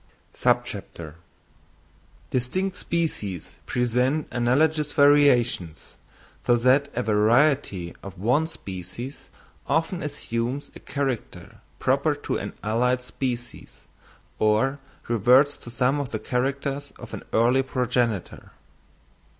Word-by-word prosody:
_Distinct 125 - -4
Species 150 - -3
present 125 +5 +1
analogous 145 +5 +2
Variations, 135 - +3 0.4
so 120 - +4
that 130 +4 +3
a 125 - 0
Variety 110 - +2
of 95 -1 -9
one 125 - +2
Species 100 - -8 0.4
often 165 +3 0
assumes 135 -3 -3
a - - -9
Character 135 -5 -4 0.2
Proper - - +2
to - - -3
an - - -5
allied 125 +4 +1
Species, 125 -1 -5 0.6
or 110 +6 +2 0.3
reverts 125 +6 +4
to - - -11
some 130 +4 +1
of 140 -3 -3
the 110 - -2
Characters 135 +4 -2
of - - -11
an - - -5
early 120 +4 +4
Progenitor. 125 -6 -1
125 Hz, 100 wpm, -25 LUFS, 115-140 Hz, 0.6 s, so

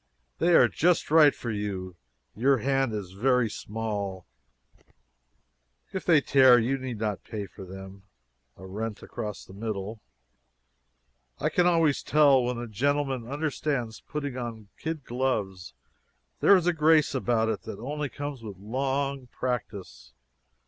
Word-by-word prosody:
] - - -46
They 175 0 +4
are - - +7
just 175 -3 +1
right 155 -2 +7
for 120 - -5
you 100 -4 -4 0.4
your 130 +6 +3
hand 135 +1 +1
is 100 -4 -5
very 125 +4 +2
small 105 -4 -4 1.7
if 190 - -4
they 165 -4 +6
tear 130 -3 +6
you 125 +4 0
need 130 -3 -5
not 105 -2 -3
pay 105 -3 -5
for 95 - -11
them. 95 +1 -10 0.6
[A 95 - -11
rent 105 +3 -5
across 105 -4 -6
the - - -14
middle.] 105 0 -5 1.4
I - - 0
can 180 0 +3
always 165 -5 +3
tell 140 -4 +4
when 125 0 -2
a 120 - -4
gentleman 135 +2 -1
understands 140 -4 -2
putting 145 -3 -5
on 115 -4 -6
kid 160 -3 -5
gloves. 105 -8 -2 0.6
There 200 - +7
is 180 -3 +2
a 175 - +3
grace 155 -1 +4
about 120 -4 +1
it 110 -3 -2
that - - -6
only 145 +4 -4
comes 145 -2 -6
with 105 -4 -8
long 135 +5 -2
practice." 105 - -5
120 Hz, 145 wpm, -27 LUFS, 105-140 Hz, 1.7 s, are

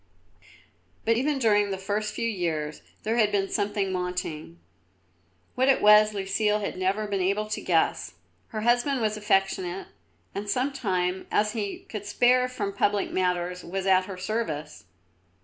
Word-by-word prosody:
But 230 - +3
even 280 +4 +1
during 210 -5 +3
the 195 - -2
first 205 +2 -2
few 230 - -1
years 160 -7 -2 0.2
there 225 +2 0
had 215 -3 +3
been 195 -1 0
something 200 -2 -1
wanting. 180 - -4 0.9
What 260 +1 +1
it 270 - +5
was 210 0 +7
Lucile 210 +2 +1
had 205 - -4
never 190 +3 0
been 200 -2 -1
able 200 +3 +1
to 215 - -3
guess. 160 - 0 0.3
Her 215 - -5
husband 245 +4 +2
was 215 -2 0
affectionate 195 -3 0 0.4
and 205 +1 -5
such 265 +4 -1
time 185 -4 -1
as 210 0 +2
he 210 -3 -4
could 210 -2 -6
spare 250 +4 +3
from 210 -6 -4
public 205 0 +1
matters 180 -1 -1
was 190 +2 -4
at 185 -1 +4
her 190 -1 -7
service. 180 -7 -4
205 Hz, 155 wpm, -26 LUFS, 185-215 Hz, 0.9 s, was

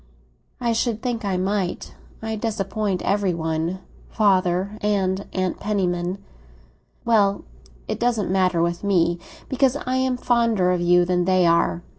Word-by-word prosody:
"I 235 -2 0
should 225 -1 -1
think 240 -3 -2
I 195 -2 -1
might. 190 -1 -2 0.3
I 220 0 -2
disappoint 210 -3 -2
every 195 -2 +1
one—father 185 +4 -1
and 200 -2 0
Aunt 185 -1 -2
Penniman." 180 -3 -1 0.9
"Well, 205 -4 +3 0.4
it - - -3
doesn't 230 -5 0
matter 185 -3 +2
with 170 +2 -2
me, 175 -3 +2 0.3
because 265 0 +2
I 255 +1 0
am 260 -1 0
fonder 230 -7 +2
of 180 -1 0
you 175 0 +4
than 180 0 +1
they 185 -1 +3
are." 170 +1 +2
195 Hz, 135 wpm, -23 LUFS, 180-220 Hz, 0.9 s, you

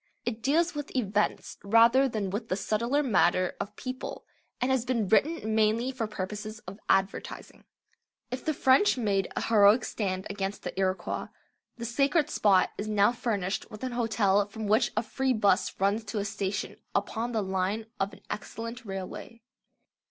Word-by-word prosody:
It 230 -2 -3
deals 325 +7 +2
with 290 -2 -6
events 210 -4 -1
rather 230 +6 +5
than 210 -5 -2
with 220 +3 -4
the 185 - +1
subtler 235 +8 0
matter 185 -6 +2
of 210 +1 -5
people, 255 +2 -6 0.3
and 250 +2 +1
has 260 -3 +2
been 235 -5 0
written 220 - +2
mainly 220 +4 +2
for 245 -4 -3
purposes 210 +2 -5
of 195 +3 -9
advertising. 195 0 -1 0.7
If 255 - -4
the 310 -2 -1
French 265 +8 +4
made 200 -5 +1
a - - -1
heroic 220 +1 +5
stand 190 -3 -2
against 200 0 -4
the - - -4
Iroquois, 190 0 -1 0.5
the 235 - -5
sacred 285 +6 +1
spot 195 -3 +3
is 210 - -3
now 210 0 +4
furnished 210 -6 -2
with 215 +1 -10
an 255 - -2
hotel 210 -4 +2
from 220 +1 -6
which 220 +3 +3
a 215 - +2
free 265 +3 0
'bus 205 -4 +1
runs 200 +3 +1
to 215 +1 -5
a 200 - -1
station 200 0 -3 0.2
upon 225 +4 -1
the 220 -3 0
line 190 +3 -1
of 195 +1 0
an - - -15
excellent 230 +3 -6
railway. 195 +3 -7
215 Hz, 165 wpm, -28 LUFS, 200-245 Hz, 0.7 s, rather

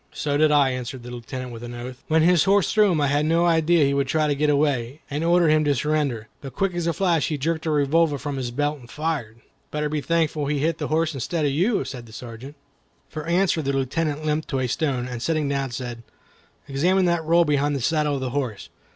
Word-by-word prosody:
"So 145 -1 -2
did 155 +1 +4
I," 140 -3 +4
answered 125 0 -5
the 120 - -8
Lieutenant, 125 +1 -6
with 115 -1 -9
an 120 0 -7
oath. 125 +1 -8
"When 160 0 +3
his 175 -2 +4
horse 195 -2 +3
threw 210 -3 +4
him 165 - +1
I 145 - +2
had 145 +1 +1
no 165 +2 +2
idea 165 -1 +3
he 140 - +1
would 140 -1 0
try 155 +3 +1
to 150 - +1
get 150 +2 +1
away, 140 -2 0
and 145 +3 -2
ordered 170 -1 +4
him 155 0 +4
to 145 -1 +2
surrender. 140 -5 -1
But 135 - -9
quick 195 -2 0
as 175 -1 -2
a - - +3
flash 170 -3 +1
he 155 - -2
jerked 160 +3 -2
a - - +1
revolver 150 +1 +2
from 145 0 -4
his 125 -2 -3
belt, 145 +4 -1
and 120 -2 -15
fired." 140 -8 -3 0.3
"Better 150 0 -2
be 150 0 -2
thankful 155 -2 0
he 150 0 0
hit 160 +3 0
the 150 - -2
horse 160 +1 0
instead 150 +4 -2
of 140 - +1
you," 190 - +1
said 120 -3 -8
the 110 - -14
Sergeant. 125 +5 -9 0.5
For 155 0 -6
answer 175 -1 +2
the 140 -1 -1
Lieutenant 145 +3 -1
limped 155 +1 -1
to 135 - -2
a 130 - 0
stone, 130 -2 -1
and 125 -2 -6
sitting 155 +1 0
down, 140 -1 -1
said: 120 -1 -6 0.7
"Examine 180 +7 +2
that 170 -2 +1
roll 170 +2 +4
behind 145 -1 +1
the - - -1
saddle 150 +1 +1
of 135 - -4
the 130 -1 -3
horse. 125 -7 -3
150 Hz, 245 wpm, -23 LUFS, 135-160 Hz, 0.7 s, did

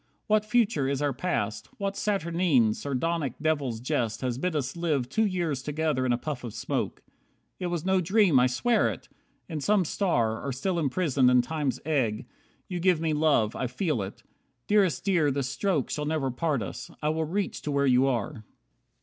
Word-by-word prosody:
What 215 -1 +3
future 215 - +2
is 140 +1 -1
our 145 -1 +1
past? 110 - -2
What 200 0 -2
saturnine, 170 - +2
Sardonic 145 +1 -2
devil's 145 -7 0
jest 115 -2 -1
has 125 -1 -2
bid 180 +2 -1
us 135 -1 -2
live 155 -7 0
Two 220 +11 +1
years 170 -8 -1
together 150 -3 -1
in - - +2
a 120 - +2
puff 140 -1 -5
of 120 -4 -6
smoke? - - -3 0.6
It 180 - -2
was 175 -2 -3
no 190 -1 +3
dream, 185 - +4
I 125 - +5
swear 225 - +2
it! - - -8 0.4
In 155 -4 -4
some 205 +3 +3
star, 120 - 0
Or 140 - -2
still 170 +8 -1
imprisoned 140 -3 +2
in 125 -1 +5
Time's 150 -1 -2
egg, 130 -9 0 0.4
you 180 -2 -4
give 180 -2 +3
Me 160 -1 0
love. 150 -8 +2
I 130 - -1
feel 130 - -1
it. 95 +1 -7 0.4
Dearest 200 -5 +2
Dear, 175 -7 +3
this 135 -1 -1
stroke 165 -2 -1
Shall 150 - -2
never 150 -4 -1
part 140 -2 -1
us, 95 - -7
I 150 - +2
will 160 +1 0
reach 190 +4 -2
to 150 - -3
where 140 0 +2
you 130 0 +4
are." 125 -1 -2
150 Hz, 190 wpm, -27 LUFS, 130-175 Hz, 0.6 s, I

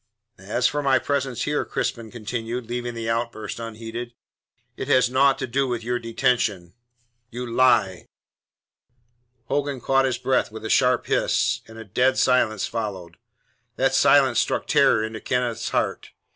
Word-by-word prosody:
"As 105 +5 -2
for 145 +3 +1
my 135 -2 +3
presence 135 -2 -2
here," 150 0 0
Crispin 115 -2 -3
continued, 115 +2 -5
leaving 120 +1 -4
the 115 -1 -4
outburst 115 -2 -3
unheeded, 115 +1 -7 0.6
"it - - -5
has 125 -1 +3
naught 135 +1 +4
to 135 - -3
do 135 +2 0
with 120 -2 -3
your 120 +1 -1
detention." 115 -7 -1 0.6
"You 125 +1 -5
lie!" 115 -6 +2 1.4
Hogan 140 -1 -2
caught 135 +2 +2
his 130 -2 0
breath 130 -2 0
with 110 0 -9
a - - -2
sharp 125 -2 +3
hiss, - - +1
and 110 0 -13
a 115 - -9
dead 125 +6 +1
silence 110 -5 +2
followed. 95 -7 -5 0.6
That - - +1
silence - - +4
struck - - 0
terror 110 - +3
into 110 0 -5
Kenneth's 125 -3 -1
heart. - - -2
120 Hz, 150 wpm, -23 LUFS, 110-130 Hz, 1.4 s, naught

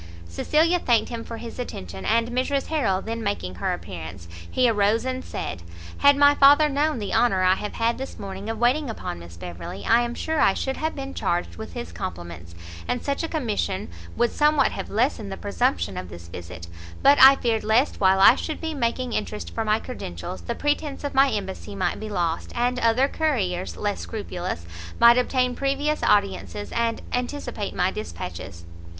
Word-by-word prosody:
Cecilia 315 - +2
thanked 235 -8 +2
him 230 -1 -5
for 230 - -7
his 235 +1 -8
attention, 95 - -6
and 230 +1 +2
Mrs 260 +3 0
Harrel 230 -12 +1
then 230 +1 -4
making 200 - -2
her - - +1
appearance, 85 0 -7 0.2
he 255 -1 +3
arose 215 +1 +2
and 260 0 -3
said, 85 0 -5 0.4
"Had 285 0 +6
my 285 0 +7
father 290 +2 +6
known 295 +1 +1
the 205 -3 -4
honour 195 -6 +3
I 185 0 +5
have 205 +2 -4
had 230 +1 0
this 265 - -6
morning 195 +1 -6
of 225 - -3
waiting 250 +5 +2
upon 85 - -5
Miss 85 0 -12
Beverley, 90 +2 -7
I 235 +1 +5
am 240 0 -3
sure 320 -1 -2
I 195 - +4
should 265 0 -2
have 315 +1 -2
been 275 0 -6
charged 130 - -2
with - - -8
his 80 +1 -6
compliments, 85 0 -7 0.3
and 245 - -2
such 280 -1 -1
a 330 - -2
commission 220 - -2 0.3
would 240 0 +2
somewhat 300 -1 +3
have - - -6
lessened 220 -2 0
the 195 - -5
presumption 205 - -1
of 90 -1 -6
this 85 0 -11
visit; 85 0 -8 0.4
but 280 +1 +6
I 270 +1 +10
feared 230 -4 0
lest 225 +5 +2
while 190 0 +5
I 220 - +9
should 310 +4 -4
be 320 -1 -3
making 250 -2 -1
interest 210 0 -4
for 225 - -1
my 215 0 +2
credentials, 90 - -7
the 85 - -4
pretence 295 -1 -1
of 285 - -3
my 270 +1 +5
embassy 200 -2 -4
might 185 -2 -1
be 215 - -6
lost, 170 -5 -2
and 245 +1 0
other 230 +3 +3
couriers, 210 - -1
less 205 -1 -2
scrupulous, 180 - -5 0.3
might 235 +1 +7
obtain 250 0 +1
previous 280 +2 0
audiences, 205 0 0
and 230 -1 -1
anticipate 245 -4 -3
my 180 +1 +1
dispatches." 85 - -7
225 Hz, 190 wpm, -24 LUFS, 180-265 Hz, 0.4 s, I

